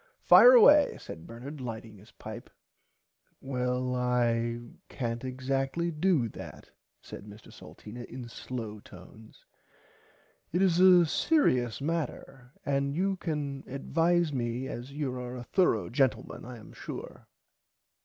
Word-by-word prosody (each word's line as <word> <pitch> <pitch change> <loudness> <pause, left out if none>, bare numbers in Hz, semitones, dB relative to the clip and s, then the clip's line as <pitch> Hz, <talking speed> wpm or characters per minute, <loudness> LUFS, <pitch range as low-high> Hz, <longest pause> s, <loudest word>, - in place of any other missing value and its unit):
Fire - - +9
away 300 -12 +7
said 80 0 -10
Bernard 130 +5 -9
lighting 110 -3 -7
his 105 +4 -17
pipe. 110 +2 -9 0.9
Well 125 -1 -2
I 120 -2 0 0.3
cant 115 -2 -4
exactly 135 +6 -2
do 155 -5 +1
that - - -11 0.3
said - - -10
Mr 105 +1 -13
Salteena 120 +3 -10
in 125 0 -9
slow 115 -3 -6
tones 100 +3 -15 1.1
it 175 - 0
is 180 -2 +3
a 180 -2 +7
searious 130 - +1
matter 135 -5 -4
and 140 0 0
you 195 +3 +1
can 145 -5 -4
advise 165 +4 +1
me 120 0 -2
as 125 +1 -7
you 140 -2 -3
are 125 0 -6
a 120 - -7
thorugh 120 - +1
gentleman 130 0 0
I 125 0 -8
am 110 - -14
sure. - - -9
130 Hz, 125 wpm, -29 LUFS, 120-155 Hz, 1.1 s, Fire